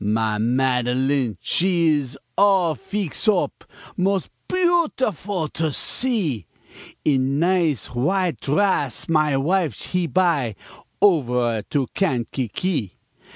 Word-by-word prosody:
Ma 110 0 0
Madeline 125 0 +1
she 175 -2 +2
is 140 -3 -1 0.2
all 190 -5 +4
feex 195 +3 -3
op, 205 -4 +1 0.3
Mos' 190 0 0 0.2
beautiful 260 - 0
to 160 +1 -1
see, 165 - -1 0.6
In 135 -1 +2
nice 165 - +1
w'ite 175 +8 0
drass, 145 - 0
my 155 -3 +2
wife 160 - 0
he 180 -2 0
buy 160 - +1 0.5
Overe 125 - +2
to 140 -3 +1
Kankakee. 130 - -1
155 Hz, 100 wpm, -22 LUFS, 125-190 Hz, 0.6 s, all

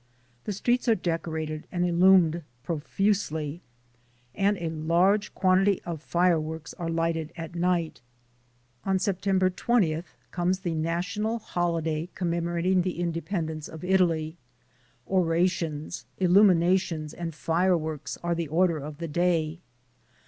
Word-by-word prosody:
The - - -2
streets 240 +6 0
are 230 - +5
decorated 160 -3 -3
and 175 0 0
illumined 175 -1 +5 0.2
profusely, 165 -1 -1 0.7
and 200 +6 +1
a 170 -2 -3
large 170 +6 +2
quantity 190 +1 +3
of 165 -3 -5
fireworks 160 -2 0
are 170 -1 -2
lighted 165 -1 -1
at 165 0 -6
night. 175 -3 0 0.8
On 190 -1 +1
September 190 0 +1
20th 175 -5 0 0.2
comes 180 +2 0
the 175 -3 -2
national 175 +8 -1
holiday 170 -5 -2
commemorating 170 +1 0
the 180 -1 -3
independence 165 -2 -3
of 160 +1 -10
Italy. 175 -4 +1 0.7
Orations, 170 -3 0
illuminations 180 -4 +3
and 165 -3 -5
fireworks 160 -2 0
are 170 0 +1
the 170 -1 -2
order 165 +1 +2
of 145 +1 -7
the 165 +1 -4
day. 165 0 0
170 Hz, 115 wpm, -27 LUFS, 160-185 Hz, 0.8 s, are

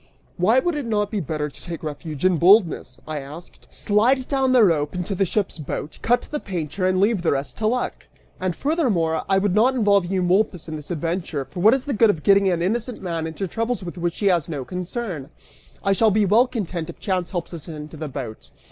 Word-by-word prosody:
"Why 200 +7 +3
would 345 +6 +2
it 290 -5 -3
not 210 -2 0
be 215 - -1
better 150 -2 -2
to 145 - -12
take 170 -2 -6
refuge 155 +1 -5
in 185 -2 +4
boldness," 170 - +4
I 155 -1 -3
asked, 150 +5 -11
"slide 245 +6 +2
down 265 -2 +2
a 245 - +7
rope 155 -5 +2
into 180 +3 -2
the 195 0 +1
ship's 195 -2 -1
boat, 150 +1 -5
cut 245 +1 +2
the 300 - -4
painter, 185 - -3
and 185 0 +2
leave 205 -1 +2
the 170 - +2
rest 140 +1 -3
to 215 - 0
luck'? 250 +3 -2 0.3
And 185 -2 -1
furthermore, 215 - +1
I 195 - +4
would 195 -1 +1
not 240 +6 +4
involve 200 -6 +3
Eumolpus 185 -1 +1
in 160 - -5
this 150 -2 -8
adventure, 165 -3 -2
for 180 - -9
what 215 +7 +6
is 265 - -4
the 285 - -2
good 225 +1 +4
of 160 -7 0
getting 195 -1 +5
an 170 -2 0
innocent 230 +5 -2
man 165 -3 -3
into 175 +4 -4
troubles 230 +3 -2
with 175 0 -6
which 175 -1 -2
he 205 - -2
has 175 -6 +2
no 140 -5 -4
concern? 180 - -5 0.5
I 195 - +3
shall 220 +3 +4
be 210 0 +3
well 225 +6 +4
content 185 -9 -4
if - - -8
chance 185 -4 -1
helps 175 -2 -4
us 165 -1 -8
into 155 -1 -8
the 155 0 -5
boat." 125 -6 -7
185 Hz, 225 wpm, -23 LUFS, 160-215 Hz, 0.5 s, a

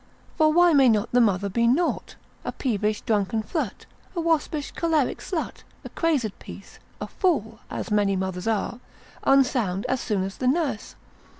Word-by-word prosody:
For 310 -2 +4
why 350 +1 +5
may 270 -3 +6
not 215 -2 +1
the 245 - +4
mother 200 -3 +2
be 235 +4 +1
naught, 315 +9 0 0.3
a - - -3
peevish 215 -4 -1
drunken 215 -1 0
flirt, 315 +8 -4 0.3
a - - -1
waspish 325 -2 0
choleric 320 -5 0
slut, 345 -5 -4 0.2
a - - -6
crazed 280 - -1
piece, - - -12 0.2
a - - -3
fool 230 - -1
(as - - -5
many 205 -2 +2
mothers 190 0 -3
are), 225 +2 -1 0.5
unsound 250 -8 +2
as 260 - -1
soon 205 -5 -1
as 195 0 -5
the 255 - -1
nurse? 275 -6 -1
240 Hz, 165 wpm, -25 LUFS, 210-310 Hz, 0.5 s, may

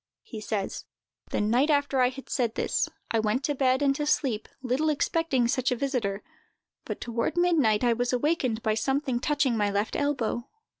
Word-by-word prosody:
He 220 -3 -8
says: 210 -2 -3 0.4
"The - - -1
night 240 +8 +2
after 285 -3 +2
I 250 - +4
had 270 +1 -10
said 235 -3 -1
this, - - 0 0.2
I 225 - +2
went 220 +5 0
to 290 - 0
bed 260 0 +2
and 275 -1 +3
to 295 - -2
sleep, 245 -7 0
little 260 +5 +1
expecting 295 -4 +1
such 255 +1 +1
a - - +2
visiter; 235 -7 -2 0.6
but, - - -5
toward 235 +7 -2
midnight, 295 -12 +3
I 240 -1 +4
was 245 +1 -1
awakened 255 -4 0
by 220 -2 +2
something 265 +3 0
touching 280 -3 +1
my 205 -2 +1
left 200 +2 -1
elbow. 260 -5 -1
255 Hz, 185 wpm, -27 LUFS, 225-285 Hz, 0.6 s, I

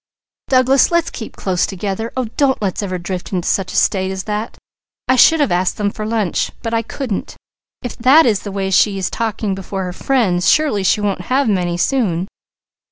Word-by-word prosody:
Douglas, 260 +1 +4
let's 340 -1 +1
keep 220 - -8
close 185 -3 0
together! 200 +3 -4
Oh 255 - 0
don't 275 -2 +2
let's 200 -2 -2
ever 185 -3 -3
drift 180 +1 -5
into 180 -3 -2
such 195 -2 0
a - - -7
state 190 -2 +2
as 190 0 -4
that. 210 +1 -4 0.5
I 255 - +4
should 320 +6 +6
have 290 - +1
asked 180 +1 0
them 205 -1 0
to 215 - -6
lunch, 215 -4 -1
but 230 - -3
I 230 - +2
couldn't. 230 -1 -5 0.5
If 245 - -6
that 270 +7 +6
is 215 -5 +2
the 205 - -7
way 195 -1 -2
she 195 +1 +3
is 190 - -2
talking 220 -3 -2
before 190 0 -5
her 180 -1 -5
friends, 190 -7 +1
surely 300 -10 +2
she 210 +3 +2
won't 200 -3 -1
have 270 +1 +2
many, 180 -4 0
soon." 185 -6 0
205 Hz, 200 wpm, -18 LUFS, 190-245 Hz, 0.5 s, should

